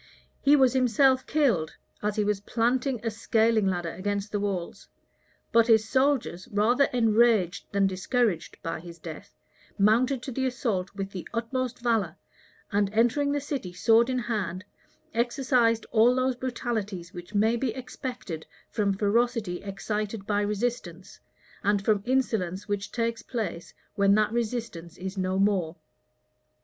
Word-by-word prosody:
He 285 +1 +6
was 265 -4 +4
himself 260 +1 +3
killed, 230 - +1 0.3
as 210 0 -1
he 210 - +1
was 205 -1 0
planting 245 +4 0
a 225 - 0
scaling 220 -1 +2
ladder 175 -3 -1
against 200 +2 -3
the 205 - -1
walls; 195 -4 -4 0.6
but 230 0 +5
his 220 -2 +4
soldiers, 260 -8 +1
rather 230 +7 +3
enraged 225 -6 +2
than 200 -1 +2
discouraged 190 -1 0
by 165 - -3
his 170 0 -11
death, 160 -1 -10 0.4
mounted 240 +5 +3
to 265 - -5
the 260 +2 -1
assault 215 -7 -2
with 195 -1 -4
the 185 -3 -7
utmost 250 +1 -2
valor, 230 -4 +1 0.5
and 205 -1 +2
entering 240 +6 +2
the 290 - 0
city 270 -10 -5
sword 225 +6 +4
in 255 - 0
hand, 205 -7 -3 0.5
exercised 235 -1 +2
all 235 +2 +5
those 255 0 +1
brutalities 220 -7 -4
which 175 +3 -9
may 220 +3 +3
be 245 +2 -1
expected 250 - -6 0.2
from 200 -3 0
ferocity 215 -2 0
excited 205 +1 -4
by 205 0 +1
resistance, 205 -4 -3 0.4
and 200 0 +1
from 210 -2 +3
insolence 210 -7 0
which 205 -1 -3
takes 230 -1 -1
place 200 -9 -5 0.2
when 200 -1 +4
that 215 0 +2
resistance 225 -8 -3
is 190 +1 -5
no 185 0 -1
more. 190 -5 +1
215 Hz, 145 wpm, -27 LUFS, 195-245 Hz, 0.6 s, He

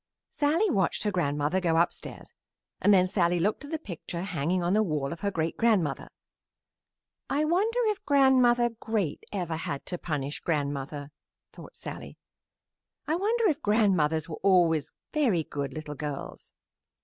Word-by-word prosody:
Sallie 330 +8 +2
watched 190 - +1
her 210 - 0
grandmother 150 0 0
go 165 -2 +2
upstairs 170 +1 -2 0.5
and 205 - +5
then 185 -2 +6
Sallie 175 -2 +2
looked 210 +10 0
at - - -10
the 320 - -2
picture 175 - -6
hanging 180 0 -1
on 175 +2 +1
the 215 - +4
wall 150 -8 -1
of 165 - -10
her 200 - 0
great 165 -4 -2
grandmother. 200 -12 +1 1.2
"I 295 +2 +1
wonder 400 +9 +1
if 425 -2 -1
Grandmother 255 -4 +4
Great 220 -8 -2
ever 175 -5 -2
had 140 -3 -4
to 180 - -4
punish 145 -3 -3
grandmother," 145 -2 -3 0.4
thought - - -13
Sallie. - - -8 0.9
"I 315 - 0
wonder 440 +6 +1
if 305 -6 0
grandmothers 185 -7 +2
were 160 - -7
always 170 -6 +3 0.2
very 235 - +2
good 140 -2 -4
little 150 +1 -6
girls?" 145 0 -6
180 Hz, 150 wpm, -28 LUFS, 155-240 Hz, 1.2 s, then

